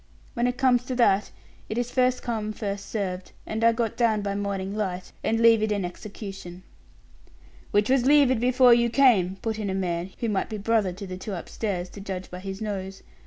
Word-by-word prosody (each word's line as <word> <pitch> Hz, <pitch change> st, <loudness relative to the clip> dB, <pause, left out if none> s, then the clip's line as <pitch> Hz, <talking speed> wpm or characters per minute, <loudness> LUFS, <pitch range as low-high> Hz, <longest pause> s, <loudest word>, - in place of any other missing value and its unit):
When 240 Hz, 0 st, +1 dB
it 250 Hz, 0 st, -2 dB
comes 250 Hz, -2 st, +3 dB
to 255 Hz, -, -3 dB
that, 210 Hz, -5 st, +3 dB, 0.4 s
it 215 Hz, -, -3 dB
is 245 Hz, 0 st, -1 dB
'first 255 Hz, -1 st, +1 dB
come, 215 Hz, -3 st, -2 dB
first 200 Hz, -2 st, -4 dB
served,' 185 Hz, -4 st, -4 dB
and 220 Hz, +1 st, -3 dB
I 230 Hz, -, +6 dB
got 230 Hz, -1 st, -2 dB
down 220 Hz, -4 st, +2 dB
by 200 Hz, 0 st, -2 dB
morning 200 Hz, -1 st, -3 dB
light, 185 Hz, -4 st, -3 dB
and 225 Hz, -, +1 dB
levied 225 Hz, -2 st, +5 dB
an 200 Hz, -3 st, 0 dB
execution." 190 Hz, -1 st, -8 dB, 1.1 s
"Which 205 Hz, +1 st, +2 dB
was 260 Hz, -1 st, +3 dB
levied 280 Hz, -4 st, +5 dB
before 250 Hz, 0 st, +6 dB
you 235 Hz, 0 st, +3 dB
came," 225 Hz, -8 st, +4 dB
put 220 Hz, -1 st, -2 dB
in 205 Hz, -2 st, -2 dB
a 190 Hz, -, -1 dB
man 175 Hz, -1 st, -2 dB
who 235 Hz, -, -2 dB
might 205 Hz, -3 st, -1 dB
be 215 Hz, -, -4 dB
brother 210 Hz, -2 st, +1 dB
to 195 Hz, +3 st, -8 dB
the 185 Hz, -1 st, -6 dB
two 200 Hz, +2 st, -6 dB
upstairs, 185 Hz, 0 st, -3 dB
to 200 Hz, -, -10 dB
judge 190 Hz, -2 st, -6 dB
by 180 Hz, -, -6 dB
his 195 Hz, +2 st, -6 dB
nose. 195 Hz, -2 st, -5 dB
210 Hz, 205 wpm, -26 LUFS, 190-235 Hz, 1.1 s, I